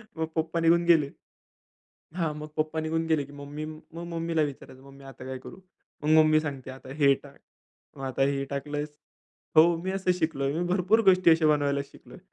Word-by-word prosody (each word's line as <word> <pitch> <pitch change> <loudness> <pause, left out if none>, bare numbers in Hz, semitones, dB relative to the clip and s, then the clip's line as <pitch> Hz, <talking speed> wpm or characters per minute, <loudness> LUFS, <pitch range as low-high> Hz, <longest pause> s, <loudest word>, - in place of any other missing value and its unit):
मग 160 - -1
पप्पा 160 +1 -1
निघून 170 +1 +3
गेले 160 -5 +4 1.1
हां, 165 -4 -1
मग 150 0 -7
पप्पा 155 +1 -1
निघून 160 +1 -1
गेले 155 -3 +1
की 145 - -14
मी, 145 +2 -7 0.4
मम्मीला 165 -1 -1
विचारायचं, 135 -2 -6
"मग 140 - -14
मी 135 0 -15
आता 135 -1 -11
काय 130 0 -5
करू?" 185 - -12 0.4
मग 150 - -2
मम्मी 155 0 +4
सांगते, 135 -4 -6
"आता 130 0 -10
हे 140 -1 +6
टाक, 140 -1 -15 0.6
मग 135 - -6
आता 130 0 -1
हे 140 0 -2
टाकलंस" 145 +2 -3 0.7
हो, 155 - +9 0.2
मी 190 - -2
असं 190 -1 +1
शिकलोय. 140 -4 0
मी 170 +4 -1
भरपूर 195 +4 +3
गोष्टी 185 -2 +4
अशा 160 -1 +4
बनवायला 145 -2 +2
शिकलोय. - - -15
155 Hz, 185 wpm, -27 LUFS, 140-165 Hz, 1.1 s, हो